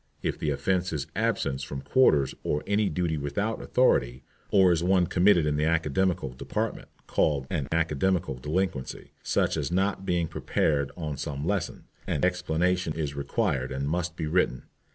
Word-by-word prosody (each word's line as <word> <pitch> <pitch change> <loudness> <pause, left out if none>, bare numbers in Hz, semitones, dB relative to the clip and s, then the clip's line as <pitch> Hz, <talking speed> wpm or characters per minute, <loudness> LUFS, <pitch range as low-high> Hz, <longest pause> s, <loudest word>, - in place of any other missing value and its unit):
If - - -2
the 75 - -1
offence 90 +6 0
is 75 -3 -2
absence 65 0 0
from 70 0 -5
quarters 70 - +3
or 75 - -1
any 105 0 +1
duty 80 -1 -1
without 75 +11 -2
authority, 65 - +2 0.3
or 95 -3 +5
is 85 -1 +1
one 90 0 +3
committed 90 -1 +4
in 75 -1 0
the 75 - +1
Academical 80 -1 +1
Department, 65 0 -4 0.2
called 70 -4 +1
an 70 - -1
Academical 80 +1 +1
Delinquency, 75 +1 -3
such - - +1
as - - -2
not 95 +2 0
being 85 -3 0
prepared 70 -2 0
on 75 -4 -4
some 70 0 -4
lesson, 100 +1 -2 0.2
an - - +1
explanation 90 -1 0
is 75 -3 -3
required 70 -2 -1
and 70 +1 -2
must 85 +2 -2
be 80 - -3
written. 75 -6 +1
80 Hz, 160 wpm, -27 LUFS, 70-90 Hz, 0.3 s, or